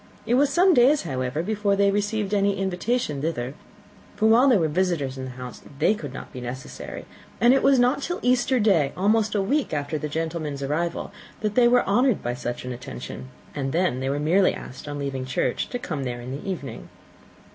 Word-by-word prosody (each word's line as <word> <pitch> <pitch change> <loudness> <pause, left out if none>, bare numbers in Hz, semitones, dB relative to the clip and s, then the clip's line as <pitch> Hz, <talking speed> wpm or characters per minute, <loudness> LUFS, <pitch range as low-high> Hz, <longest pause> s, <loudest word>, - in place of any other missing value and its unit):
It 235 - 0
was 275 +3 +4
some 365 +1 +5
days, 270 +1 +5
however, 130 0 -2
before 205 0 0
they 200 0 +3
received 205 0 -1
any 200 -1 +2
invitation 190 - -1
thither, 135 -5 -2 0.6
for 220 - 0
while 230 +5 +6
there 245 - +5
were 165 -4 +2
visitors 160 -5 0
in 130 -1 -5
the - - -6
house 125 -1 -8 0.2
they 160 +8 +3
could 150 -10 -6
not 135 - -9
be 125 - -7
necessary; 125 +2 -7 0.3
and 240 +2 +6
it 270 - +3
was 275 -1 +5
not 250 +3 +3
till 350 +5 -2
Easter 250 +1 +2
day, 175 -10 +3
almost 215 +3 +2
a 200 - +2
week 270 - 0
after 145 +1 -2
the 150 - -4
gentlemen's 155 -2 -3
arrival, 160 +5 -2 0.3
that 215 -2 -1
they 240 +1 +5
were 245 +1 +4
honoured 245 +3 +2
by 120 - -1
such 120 0 -5
an 125 - -4
attention, 125 +1 -7 0.3
and 135 -2 -3
then 170 -6 +1
they 135 +1 -2
were 140 +1 -1
merely 180 +6 +3
asked 130 +3 -9
on 145 0 -4
leaving 135 -2 -3
church 130 -1 -1
to 245 - -3
come 155 - -4
there 120 -2 -4
in 120 +2 -7
the 145 +8 -5
evening. 160 -8 -6
175 Hz, 210 wpm, -24 LUFS, 135-220 Hz, 0.6 s, while